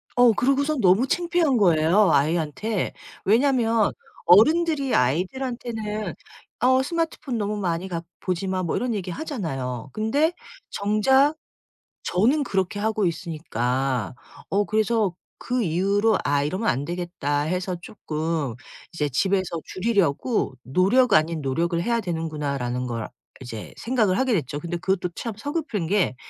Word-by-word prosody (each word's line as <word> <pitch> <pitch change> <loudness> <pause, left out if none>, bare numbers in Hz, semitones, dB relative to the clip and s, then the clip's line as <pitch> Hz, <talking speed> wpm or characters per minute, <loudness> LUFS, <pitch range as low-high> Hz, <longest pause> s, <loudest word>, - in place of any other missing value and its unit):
어 245 -1 +6
그러고서는 275 +5 +1
너무 195 +7 +4
창피한 340 -4 +1
거예요 175 0 +4
아이한테. 165 +8 0 0.3
왜냐면 230 -1 +3 0.3
어른들이 290 - +4
아이들한테는 215 - -1 0.4
"어 260 +2 +4
스마트폰 310 -4 -2
너무 210 0 -2
많이 180 -2 -2
가 170 -3 -3 0.2
보지 185 +1 -2
마." 185 -1 -1
뭐 170 - -1
이런 245 -1 -1
얘기 185 -3 -4
하잖아요. 135 - -4
근데 280 +10 +1 0.4
정작 265 +9 +3 0.7
저는 240 - +2
그렇게 195 -4 -1
하고 215 -1 0
있으니까. 135 - -2 0.4
어 205 +1 +1
그래서 215 -3 +1 0.2
그 245 -1 -1
이후로 200 +5 +2
'아, 145 0 +1
이러면 185 +10 -2
안 135 +3 -1
되겠다.'해서 175 +1 -2
쪼끔 155 - -3 0.4
이제 150 -3 -1
'집에서 185 +4 0
줄이려고 200 - 0
노력 200 - +3
아닌 155 +1 +3
노력을 170 +5 0
해야 235 +5 +1
되는구나.'라는 150 - -3
걸 115 -2 -4 0.3
이제 115 -4 -8
생각을 220 -6 +1
하게 260 -1 +1
됐죠. 145 - -2
근데 175 +1 -3
그것도 185 0 -1
참 230 +4 -5
서글픈 285 - -3
게 190 -7 +1
190 Hz, 300 characters per minute, -24 LUFS, 160-235 Hz, 0.7 s, 어